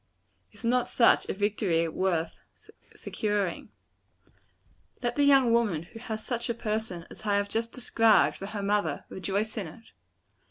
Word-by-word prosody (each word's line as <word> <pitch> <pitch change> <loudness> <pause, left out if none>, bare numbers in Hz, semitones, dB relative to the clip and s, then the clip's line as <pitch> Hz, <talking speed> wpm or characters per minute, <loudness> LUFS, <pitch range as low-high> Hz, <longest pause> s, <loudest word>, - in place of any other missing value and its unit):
Is - - -16
not 245 +1 +1
such 235 - +4
a - - 0
victory 195 -5 +1
worth 170 -1 -1 0.6
securing? 205 -4 -2 1.3
Let 240 0 -1
the 290 - +2
young 270 -4 +5
woman 210 -9 +1
who 225 +6 -12
has 220 -2 -6
such 235 -1 -2
a 235 - 0
person 215 -6 -2
as - - -12
I 205 -1 +1
have 200 0 0
just 230 +1 -1
described, 225 - +3
for 195 - -6
her 205 -1 -5
mother, 205 +1 0
rejoice 200 +4 -2
in 200 -5 -3
it. 220 +8 -14
215 Hz, 155 wpm, -28 LUFS, 190-230 Hz, 1.3 s, young